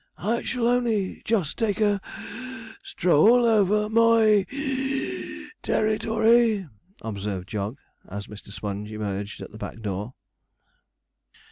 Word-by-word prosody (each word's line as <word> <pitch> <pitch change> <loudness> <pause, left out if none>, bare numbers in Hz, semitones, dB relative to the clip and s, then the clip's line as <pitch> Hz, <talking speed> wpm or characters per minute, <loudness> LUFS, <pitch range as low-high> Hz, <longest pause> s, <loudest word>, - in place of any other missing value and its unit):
'I 230 +5 0
shall 240 -2 -1
only 235 -6 +1
just 200 -10 0
take 220 -3 0
a 205 -2 +2
(puff) 255 -3 -9
stroll 210 +9 +4
over 210 -2 +3
moy 220 -2 +4
(wheeze) 270 -1 -3
ter - - +1
ri 215 0 +1
to 225 0 -3
ry,' 225 -4 +4 0.4
observed 100 -3 -4
Jog, 105 +4 -3 0.3
as 100 +1 -6
Mr. 105 -1 -11
Sponge 105 +1 -5
emerged 105 -1 -4
at - - -10
the 110 - -11
back 115 - -6
door. 105 +4 -4
210 Hz, 130 wpm, -25 LUFS, -, 0.4 s, stroll